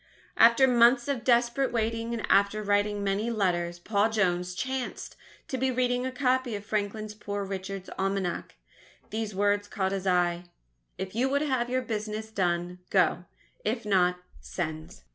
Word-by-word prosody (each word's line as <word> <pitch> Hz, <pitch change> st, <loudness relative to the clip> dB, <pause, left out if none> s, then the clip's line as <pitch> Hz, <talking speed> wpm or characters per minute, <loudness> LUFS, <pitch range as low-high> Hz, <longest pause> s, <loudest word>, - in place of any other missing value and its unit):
After 235 Hz, +3 st, +6 dB
months 240 Hz, 0 st, +5 dB
of 270 Hz, -5 st, -2 dB
desperate 240 Hz, +2 st, +2 dB
waiting 230 Hz, 0 st, -1 dB
and 235 Hz, -2 st, -2 dB
after 200 Hz, +2 st, +3 dB
writing 205 Hz, 0 st, +1 dB
many 200 Hz, +3 st, 0 dB
letters, 175 Hz, -6 st, 0 dB
Paul 205 Hz, +4 st, +1 dB
Jones 180 Hz, -4 st, 0 dB
chanced 260 Hz, +3 st, -4 dB, 0.3 s
to 260 Hz, -, -3 dB
be 265 Hz, +1 st, +1 dB
reading 250 Hz, 0 st, 0 dB
a -, -, -3 dB
copy 255 Hz, -3 st, 0 dB
of 205 Hz, 0 st, -7 dB
Franklin's 215 Hz, 0 st, -2 dB
"Poor 205 Hz, -1 st, -4 dB
Richard's 195 Hz, 0 st, -5 dB
Almanack." 195 Hz, -2 st, -2 dB, 0.6 s
These 215 Hz, -2 st, -3 dB
words 205 Hz, +1 st, +1 dB
caught 190 Hz, -2 st, -1 dB
his 195 Hz, -1 st, -3 dB
eye: 175 Hz, -1 st, +1 dB, 0.5 s
_If 190 Hz, 0 st, -5 dB
you 250 Hz, +4 st, +1 dB
would 280 Hz, +2 st, +1 dB
have 260 Hz, -5 st, 0 dB
your 255 Hz, +1 st, 0 dB
business 215 Hz, -1 st, -4 dB
done, 180 Hz, -2 st, -1 dB
go -, -, +2 dB, 0.4 s
if 230 Hz, -, -2 dB
not, 180 Hz, -3 st, +3 dB, 0.2 s
send. 155 Hz, -, -6 dB
210 Hz, 155 wpm, -28 LUFS, 190-240 Hz, 0.6 s, After